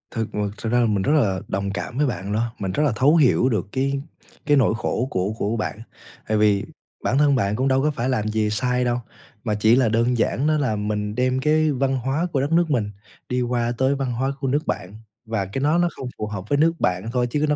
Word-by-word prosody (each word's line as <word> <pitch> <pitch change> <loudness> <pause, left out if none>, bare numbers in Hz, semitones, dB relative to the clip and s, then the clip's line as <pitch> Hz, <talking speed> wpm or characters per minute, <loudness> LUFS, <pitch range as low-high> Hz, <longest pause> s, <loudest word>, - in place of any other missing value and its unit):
Thực 110 -2 -1
m - - -5 0.2
thực 115 - -3
ra 120 - +3
là 120 - +3
mình 105 -3 +1
rất 145 - +2
là 100 -11 +2
đồng 100 +1 -2
cảm 110 +5 -5
với 150 - +3
bạn 100 -5 -3
đó, 115 +2 -1
mình 95 -2 -2
rất 150 - 0
là 145 - +3
thấu 140 +8 +4
hiểu 135 -4 +4
được 110 -3 -1
cái 135 +1 -1 0.4
cái 145 -1 +4
nỗi 120 -5 +3
khổ 125 +2 -1
của 95 0 -1
của 110 +3 -1
bạn. 110 0 -3 0.5
Tại 110 0 +1
vì 105 -2 +3 0.4
bản 130 - +1
thân 145 -1 +4
bạn 105 -4 0
cũng 130 +3 0
đâu 135 0 +3
có 150 - +2
phải 125 -2 -2
làm 110 -5 0
gì 110 0 0
sai 125 +3 0
đâu, 120 0 +1 0.5
mà 105 -2 0
chỉ 110 +2 +4
là 125 -3 +3
đơn 115 +2 +1
giản 135 +5 +1
đó 155 - +3
là 130 -7 0
mình 105 0 -2
đem 130 +1 +1
cái 155 +2 +2
văn 135 0 0
hóa 135 +7 -1
của 135 - +2
đất 145 - -2
nước 170 0 +3
mình 105 -6 0 0.4
đi 125 0 0
qua 120 -1 0
tới 130 +2 +2
văn 135 -3 -2
hóa 130 +3 -1
của 135 - -2
nước 145 +4 0
bạn, 90 +2 -3 0.3
và 110 -3 -2
cái 100 +8 -4
nó 150 +4 +3
nó 175 0 +3
không 130 - -6
phù 105 - -3
hợp 100 -1 -6
với 145 - +2
nước 165 +3 +4
bạn 90 +4 0
thôi 125 -1 +1
chứ 145 +5 0
nó 150 - +3
125 Hz, 260 wpm, -23 LUFS, 105-135 Hz, 0.5 s, thấu